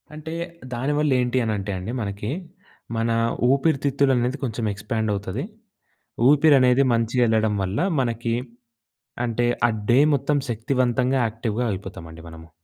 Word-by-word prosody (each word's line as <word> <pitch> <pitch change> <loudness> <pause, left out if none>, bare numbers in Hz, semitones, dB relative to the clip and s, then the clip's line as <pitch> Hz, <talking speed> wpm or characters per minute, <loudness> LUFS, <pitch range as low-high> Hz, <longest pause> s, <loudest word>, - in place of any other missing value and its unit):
అంటే, 160 +1 -7 0.4
దాని 130 +5 -1
వల్ల 150 -1 +1
ఏంటి 125 +1 0
అనంటే 105 -2 -2
అండి 95 +5 -5
మనకి, 100 0 -4 0.7
మన 115 +1 0 0.4
ఊపిరితిత్తులు 140 -1 +2
అనేది 125 +3 0
కొంచెం 115 -2 -2
ఎక్స్‌పాండ్ 110 +2 -3
అవుతది. 100 +4 -4 0.9
ఊపిరనేది 140 -3 +5
మంచిగెళ్ళడం 115 -2 +2
వల్ల 95 +3 -2 0.2
మనకి 115 -2 -1 0.9
అంటే, 120 0 0 0.2
ఆ - - 0 0.2
డే 125 - +5 0.2
మొత్తం 145 +2 0
శక్తివంతంగా, 125 +2 0
యాక్టివ్‌గా, 115 +1 -3
అయిపోతామండి 85 -4 -9
మనము. 80 0 -12
120 Hz, 120 wpm, -23 LUFS, 110-135 Hz, 0.9 s, ఊపిరనేది